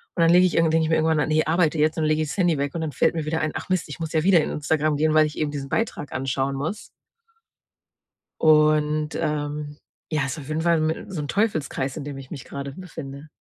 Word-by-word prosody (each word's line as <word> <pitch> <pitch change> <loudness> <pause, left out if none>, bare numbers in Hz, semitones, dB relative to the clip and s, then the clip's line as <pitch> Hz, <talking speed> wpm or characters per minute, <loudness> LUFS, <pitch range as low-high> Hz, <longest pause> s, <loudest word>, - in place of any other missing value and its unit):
Und - - -6
dann 165 - +5
lege 180 +1 +6
ich 180 - 0
irgendw 165 -1 +3
denke 160 0 +2
ich - - -2
mir 160 - +3
irgendwann: 160 0 +2
„Ah - - +1
ne, 155 0 +2
arbeite 165 -1 +2
jetzt 155 +2 +2
und 160 - 0
dann 155 - +2
lege 155 0 +2
ich 155 - -5
das - - -5
Handy 175 -5 +2
weg.“ 140 0 -2
Und 165 - -2
dann 160 -2 -2
fällt - - +2
mir 160 -2 -2
wieder 160 +1 -1
ein: 155 - 0
„Ach - - -5
Mist, 185 -2 0
ich 145 - -8
muss 160 -1 -4
ja 155 -1 +2
wieder 180 -2 +5
in - - -3
Instagram 150 +1 0
gehen, 155 +1 +2
weil 155 0 +5
ich 150 - -9
eben 155 -2 -1
diesen 140 -2 -5
Beitrag 170 - -2
anschauen 135 +1 -1
muss.“ 160 +10 -4 1.5
Und, 155 0 +3
ähm, 150 0 -3 0.3
ja 155 -3 +1
ist 140 +4 -4
auf 135 - -10
jeden 155 +1 -2
Fall 165 -1 +2
mi 155 +1 -1
so 180 -6 -4
'n 145 - -5
Teufelskreis, 155 - -1
in 155 - -5
dem 140 -1 -6
ich 135 -1 -11
mich 140 -6 -7
grade 140 0 -6
befinde. 150 -5 -9
155 Hz, 265 wpm, -24 LUFS, 145-160 Hz, 1.5 s, lege